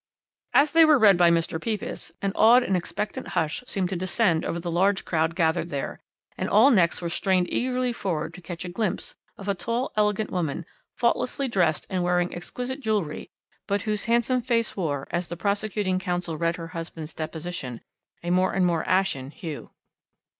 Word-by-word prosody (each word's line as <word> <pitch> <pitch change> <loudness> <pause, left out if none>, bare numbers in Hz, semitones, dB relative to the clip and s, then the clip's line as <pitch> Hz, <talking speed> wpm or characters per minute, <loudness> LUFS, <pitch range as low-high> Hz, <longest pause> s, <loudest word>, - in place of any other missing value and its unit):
"As 290 +1 +5
they 330 0 +7
were 310 -2 +6
read 210 -5 +7
by 175 -1 +5
Mr. 165 -1 0
Pepys, 215 -5 -4
an 195 - +1
awed 240 +3 +6
and 190 - 0
expectant 180 +3 -3
hush 160 +8 0
seemed 190 -6 -1
to 190 - -2
descend 185 -1 +1
over 170 - -2
the 170 0 -4
large 190 +3 +2
crowd 165 0 0
gathered 170 -1 +1
there, 140 -3 -4 0.4
and - - -1
all 225 +7 +6
necks 175 -6 +3
were - - -1
strained 180 0 +1
eagerly 255 -1 0
forward 165 -7 -3
to 180 - -11
catch 175 +1 -6
a - - -4
glimpse 210 +1 -2 0.2
of 195 - -9
a 200 - +2
tall, 235 +6 -2
elegant 210 0 +1
woman, 170 -3 -2 0.3
faultlessly 250 +3 0
dressed 175 -9 +1
and 185 -2 -1
wearing 175 0 +1
exquisite 250 +9 -5
jewellery, 210 - -2 0.4
but 200 0 0
whose 210 -2 -1
handsome 235 +2 +2
face 230 -2 0
wore, 145 -7 -2
as 175 +1 -1
the 170 - -6
prosecuting 200 0 0
counsel 175 -2 -2
read 165 +2 0
her 165 -1 -7
husband's 165 -2 -7
deposition, 155 -6 -5 0.4
a 175 - -1
more 185 +1 +2
and 190 -1 +2
more 170 -2 +1
ashen 185 -9 +1
hue. 155 -1 -7
185 Hz, 180 wpm, -25 LUFS, 170-215 Hz, 0.4 s, they